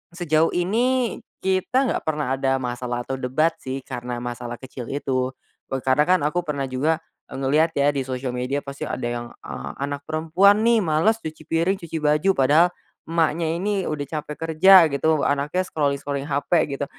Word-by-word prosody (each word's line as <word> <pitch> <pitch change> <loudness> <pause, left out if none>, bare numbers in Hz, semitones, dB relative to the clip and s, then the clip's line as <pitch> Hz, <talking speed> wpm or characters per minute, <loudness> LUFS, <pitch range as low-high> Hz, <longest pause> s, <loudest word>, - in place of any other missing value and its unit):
sejauh 165 -2 +2
ini 235 +7 +1 0.2
kita 190 +8 +1
gak - - -2
pernah 150 -4 0
ada 135 0 +1
masalah 120 -1 -3
atau - - -4
debat 140 +6 +1
sih 130 +1 -4
karena 120 0 -5
masalah 120 0 -5
kecil 130 -2 -8
itu, 130 -2 -1 0.4
eee, 135 -1 -2
karena 130 +3 +3
kan 185 0 +4
aku 175 +4 0
pernah 145 -4 -2
juga, 145 +5 +1 0.3
eee, - - -6
ngeliat 150 +5 +2
ya 140 +1 +4
di 140 - -1
sosial 130 -1 -4
media 125 +3 -1
pasti 140 0 -7
ada 125 - -3
yang 120 0 -3 0.2
a 70 +3 -6
anak 140 0 -3
perempuan 170 +7 +3
nih 235 -2 +4
males 180 +8 +2
cuci 155 0 -7
piring 170 +4 +1
cuci 165 -1 -5
baju 150 +5 +3
padahal 150 +6 +5 0.4
emaknya 165 0 +1
ini 195 +1 -1
udah 150 -2 -2 0.2
capek 150 0 -7
kerja 170 +3 +6
gitu 155 +2 +1
anaknya 145 +6 0
scrolling-scrolling 140 -3 -2
HP 140 0 -2 0.2
gitu, 140 - -3
150 Hz, 175 wpm, -23 LUFS, 135-170 Hz, 0.4 s, kerja